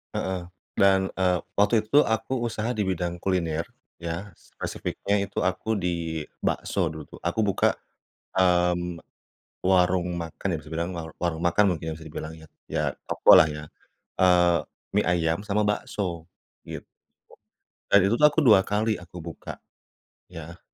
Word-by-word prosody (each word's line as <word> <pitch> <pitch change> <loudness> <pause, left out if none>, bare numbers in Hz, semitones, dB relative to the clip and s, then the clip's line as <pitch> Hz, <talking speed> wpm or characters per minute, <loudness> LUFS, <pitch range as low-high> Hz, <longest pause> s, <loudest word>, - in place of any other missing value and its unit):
Heeh. 95 -2 -2 0.3
Dan, 95 -1 +4
eee, 90 -1 +3 0.2
waktu 105 +2 +4
itu - - -20
tuh - - +6
aku 110 +3 -1
usaha 110 0 -3
di 105 - +1
bidang 90 -2 -2
kuliner 85 -3 -1 0.3
ya, 85 +4 -5
spesifiknya 100 0 -3
itu 100 - -4
aku 95 +5 0
di 85 -4 -2 0.2
bakso 95 - -1
dulu 80 -2 -5
tuh. - - -18
Aku 100 +6 0
buka, 100 -3 +2 0.6
mmm, 90 -1 +2 0.6
warung 90 -1 +3
makan, 85 +2 -5
ya - - 0
bisa 75 - -14
dibilang 85 +3 -3 0.2
warung 85 -2 -2
makan 90 +4 +3
mungkin 80 -1 -4
bisa 80 - -12
dibilang 80 +1 -7
ya, 80 - -14 0.2
ya - - -1 0.2
toko - - +5
lah 80 - +8
ya, 75 0 -6 0.5
eee, 90 -2 +4 0.4
mie - - +4
ayam 85 +1 +1
sama 105 0 0
bakso 90 -5 -2 0.4
gitu. - - -8 1.0
Dan 100 - +8
itu 115 - +2
tuh - - 0
aku 160 - 0
2 105 -5 +7
kali 105 +1 +1
aku 90 0 -12
buka. 85 -2 -8 0.7
Ya. 85 0 -9
90 Hz, 150 wpm, -26 LUFS, 85-100 Hz, 1.0 s, lah